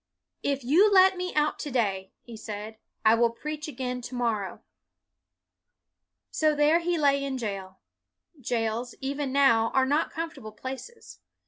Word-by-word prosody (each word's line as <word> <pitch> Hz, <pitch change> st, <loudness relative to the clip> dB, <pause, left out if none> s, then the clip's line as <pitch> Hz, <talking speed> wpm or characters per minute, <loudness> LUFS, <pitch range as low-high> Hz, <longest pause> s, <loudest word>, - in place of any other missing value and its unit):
" -, -, -58 dB
If 275 Hz, -1 st, -6 dB
you 350 Hz, -, +5 dB
let 380 Hz, -1 st, +6 dB
me 360 Hz, 0 st, -3 dB
out 300 Hz, 0 st, +1 dB
to 295 Hz, -, -4 dB
day," 200 Hz, -7 st, -1 dB
he 235 Hz, -, -10 dB
said, 215 Hz, 0 st, -7 dB
" -, -, -47 dB
I 220 Hz, -, +7 dB
will 235 Hz, +1 st, +4 dB
preach 300 Hz, +6 st, -6 dB
again 250 Hz, -3 st, -4 dB
to 245 Hz, +1 st, -7 dB
morrow.'' 225 Hz, -5 st, -2 dB, 1.7 s
So 310 Hz, -1 st, +2 dB
there 295 Hz, +3 st, +4 dB
he 345 Hz, 0 st, -1 dB
lay 280 Hz, -2 st, +2 dB
in 270 Hz, -1 st, -3 dB
jail. 195 Hz, -5 st, -5 dB, 0.6 s
Jails, 235 Hz, -1 st, -2 dB
even 275 Hz, 0 st, -3 dB
now, 230 Hz, -5 st, +4 dB
are 265 Hz, -1 st, +4 dB
not 290 Hz, +4 st, +1 dB
comfortable 320 Hz, -9 st, -6 dB
places. 265 Hz, -, -9 dB
260 Hz, 155 wpm, -27 LUFS, 225-300 Hz, 1.7 s, I